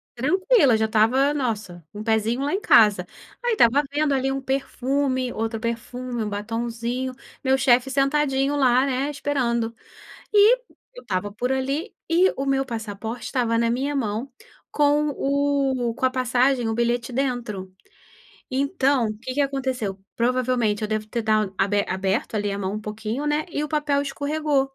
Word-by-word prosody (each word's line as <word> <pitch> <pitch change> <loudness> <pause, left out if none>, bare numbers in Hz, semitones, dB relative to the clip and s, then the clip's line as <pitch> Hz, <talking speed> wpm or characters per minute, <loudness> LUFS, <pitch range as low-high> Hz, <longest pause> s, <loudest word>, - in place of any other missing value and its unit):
Tranquila, 360 - +3
já 220 0 +2
estava, 225 +6 +3
nossa, 215 - -3
um 210 +1 -6
pezinho 225 +2 +1
lá 285 +2 -1
em 390 - +1
casa. 210 - +5 0.4
Aí 485 - +1
estava 275 - +4
vendo, 295 -1 +1
ali, 270 0 0
um 270 - -2
perfume, 265 -1 -1
outro 225 0 -3
perfume, 235 +1 -4
um 210 - -3
batonzinho, 235 +4 -3 0.3
meu 265 -1 +3
chefe 260 0 +3
sentadinho 275 0 +1
lá, 255 -2 +4
né, 270 +2 -1
esperando. 245 -5 -1 0.6
E 425 +4 +6 0.4
eu - - -11
estava 185 +2 -2
por 245 +5 -2
ali, 275 - -2
e 350 +3 +4
o 275 - -3
meu 270 0 +1
passaporte 225 -1 -5
estava 230 -2 0
na 230 0 +2
minha 275 +4 -1
mão 235 0 -2 0.4
com 295 0 +2
o 275 -3 0
com 260 - +1
a - - +2
passagem, 255 0 +1
o 225 - -1
bilhete 235 +1 0
dentro. 235 -8 -2 0.8
Então, 270 -2 +1
o 215 - -6
que 255 +2 -6
que 290 - +2
aconteceu? 260 -8 -2 0.2
Provavelmente 240 -3 +1
eu 215 - -1
devo 215 0 -2
ter 235 +2 -2
dad 215 -2 +1
aber 200 +1 +1
aberto, 190 +4 -1
ali, 205 -1 -1
a 200 - -3
mão 195 0 -3
um 215 - -4
pouquinho, 220 +6 -4
né, 295 +1 0
e 290 - -2
o - - -3
papel 295 -2 0
escorregou. 290 0 0
255 Hz, 165 wpm, -23 LUFS, 225-275 Hz, 0.8 s, E